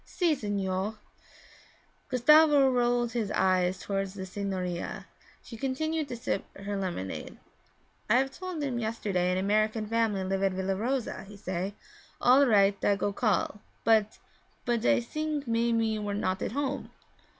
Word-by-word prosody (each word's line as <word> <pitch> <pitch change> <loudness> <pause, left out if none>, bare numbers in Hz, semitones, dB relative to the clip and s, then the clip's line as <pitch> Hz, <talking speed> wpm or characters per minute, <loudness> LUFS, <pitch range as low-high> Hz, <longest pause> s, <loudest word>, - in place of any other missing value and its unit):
'Si, 345 -4 +1
signore.' 205 -4 -2 1.1
Gustavo 290 +1 +6
rolled 240 -1 +1
his 225 -4 -2
eyes 185 -1 +2
toward 195 -1 -2
the 190 0 -7
signorina; 185 -2 -4 0.4
she 230 - -10
continued 305 +5 -1
to 245 -2 -5
sip 230 - -2
her 200 +1 -4
lemonade. 180 - -4 0.7
'I 225 - +5
have 265 +1 +2
told 365 0 -5
him 255 -4 -1
yesterday 205 -5 -1
an 180 - 0
American 215 +3 +1
family 220 -3 0
live 190 +1 -1
at 195 -1 +2
Villa 190 +1 -1
Rosa; 245 +5 -2
he 205 +1 -12
say, 190 0 -4 0.4
"All 265 +3 +5
right, 200 -3 +3
I 205 - +4
go 200 0 -1
call," 210 -1 0 0.2
but 220 -2 +3 0.5
but 235 -2 0
I 280 -4 +4
sink 300 +3 -3
maybe 230 0 +2
you 220 -1 -1
were 205 -1 -2
not 185 -2 -1
at - - -2
home.' 280 0 -2
215 Hz, 150 wpm, -29 LUFS, 195-250 Hz, 1.1 s, Gustavo